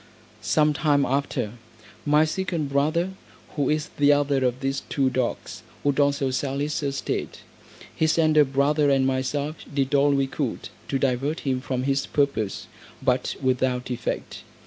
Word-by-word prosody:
Some 150 +8 +2
time 145 -2 +2
after, 135 -5 -1 0.6
my 150 +1 +5
second 165 -3 -2
brother, 155 +6 +1 0.4
who 145 -3 -1
is 155 0 0
the 145 0 +5
other 145 -2 +2
of 125 0 0
these 135 0 -1
two 135 -2 +1
dogs, 125 -2 -3 0.2
would 145 0 +1
also 140 -1 +2
sell 135 +1 -2
his 145 +2 -1
estate. 140 -1 -3 0.5
His 160 0 +2
elder 155 -2 +5
brother 145 +2 +2
and 135 -1 +3
myself 140 +3 -1
did 140 -1 -1
all 140 0 +4
we 140 -1 +2
could 135 -2 -4 0.2
to 135 - 0
divert 135 +4 0
him 130 -2 -1
from 130 -1 -2
his 135 +1 0
purpose, 140 -9 -1 0.4
but 130 -1 +1
without 130 -1 0
effect. 120 -1 -4
140 Hz, 150 wpm, -25 LUFS, 130-150 Hz, 0.6 s, my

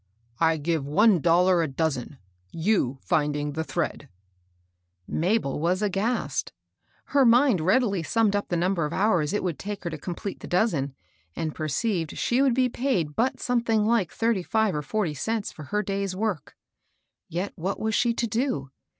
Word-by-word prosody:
" 115 0 -37
I 160 - +1
^ve 160 +2 0
one 185 +8 +4
dollar 175 +2 +4
a 165 - 0
dozen, 140 -2 -2 0.2
— 90 +1 -40 0.2
you 135 - +2
finding 145 -1 0
the 160 +2 -2
thread:' 155 -4 -3 1.0
Mabel 175 -4 0
was 180 +5 +1
aghast. 210 +4 -1 0.6
Her 280 -1 +5
mind 240 - +5
readily 200 +1 +2
summed 210 +4 +1
up 205 - -1
the 175 - -1
number 175 -1 +1
of 150 - -4
hours 180 -7 +2
it 210 - -1
would 175 -5 -2
take 205 -1 -5
her 170 - -3
to 155 - -6
complete 180 +5 -5
the - - -9
dozen, 160 - 0 0.4
and 155 -2 -3
perceived 165 - -2
she 245 +3 +1
would 265 -4 +3
be 255 0 +3
paid 230 - -1
but 250 +4 0
something 230 -3 +1
like 220 -6 +2
thirty 225 -4 0
five 220 +2 +1
or 150 - -1
forty 170 +2 -1
cents 220 - -2
for 155 - -10
her 210 +7 -1
day's 195 -1 -2
work. 200 -7 -3 0.7
Yet 180 +4 -3
what 190 +3 -3
was 220 0 -1
she 240 +1 +3
to 235 - 0
do? 220 - -2
185 Hz, 175 wpm, -26 LUFS, 155-220 Hz, 1.0 s, Her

